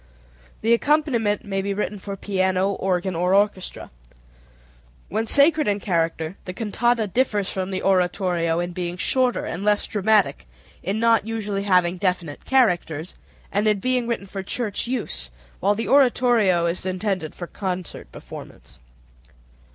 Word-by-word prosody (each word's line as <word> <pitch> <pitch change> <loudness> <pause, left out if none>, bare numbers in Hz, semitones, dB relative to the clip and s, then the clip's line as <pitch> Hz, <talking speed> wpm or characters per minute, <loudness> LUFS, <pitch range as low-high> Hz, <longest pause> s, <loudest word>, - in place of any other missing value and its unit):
The 225 +2 +3
accompaniment 235 -6 +1
may 195 -1 -2
be 200 0 -2
written 210 0 -3
for 195 0 -6
piano, 190 0 +1
organ, 185 -2 -1
or 180 +3 +2
orchestra. 200 -2 0 1.2
When 225 +1 -1
sacred 300 +3 +4
in 205 0 +1
character 165 -2 -1
the 185 - -5
cantata 235 +2 0
differs 210 -2 0
from 190 -1 -3
the 190 -1 -3
oratorio 180 -3 +1
in 175 0 -2
being 175 0 -4
shorter 250 +6 +1
and 180 +4 -5
less 210 0 +2
dramatic, 210 - +1 0.3
in 200 +4 -2
not 230 -2 +3
usually 210 -3 -2
having 180 -2 +3
definite 180 -6 -2
characters, 180 - +1 0.4
and 205 +2 +1
in 210 -1 +3
being 250 +2 0
written 235 -4 -2
for 195 0 -6
church 210 +2 -3
use, 220 - -2 0.3
while 200 +2 +2
the 225 +2 -3
oratorio 240 -9 +4
is 170 +2 0
intended 185 -3 -2
for 175 - -6
concert 185 -1 -5
performance. - - -12
195 Hz, 145 wpm, -23 LUFS, 180-225 Hz, 1.2 s, sacred